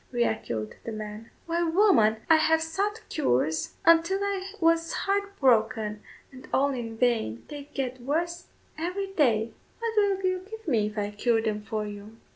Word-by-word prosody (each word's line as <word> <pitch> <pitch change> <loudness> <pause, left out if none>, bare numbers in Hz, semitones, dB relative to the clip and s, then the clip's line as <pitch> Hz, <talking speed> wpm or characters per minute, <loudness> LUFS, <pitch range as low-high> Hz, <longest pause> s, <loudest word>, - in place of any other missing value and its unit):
re 240 -1 +2
echoed 110 - -2
the 230 - -5
man; 215 +1 -7 0.2
"why, 335 +1 0
woman, 330 - +4
I 320 - +7
have 320 +1 +3
sought 400 +7 -2
cures 160 - 0
until 335 +3 +5
I 390 -1 -2
was 330 0 +2
heart 400 0 -1
broken, 220 -4 +2 0.3
and 260 -1 -12
all 280 +1 +3
in 230 -3 -5
vain; 225 - 0
they 290 -1 -8
get 255 -2 -3
worse 340 +6 -2 0.3
every 385 +4 -3
day." 230 - +2 0.3
"What 460 -1 -3
will 400 -2 +2
you 370 0 +1
give 445 -2 -9
me 225 -8 +2
if 210 +1 -8
I 205 0 -1
cure 225 +2 +1
them 215 -2 -1
for 215 0 -3
you?" 210 +2 -9
270 Hz, 170 wpm, -27 LUFS, 220-345 Hz, 0.3 s, I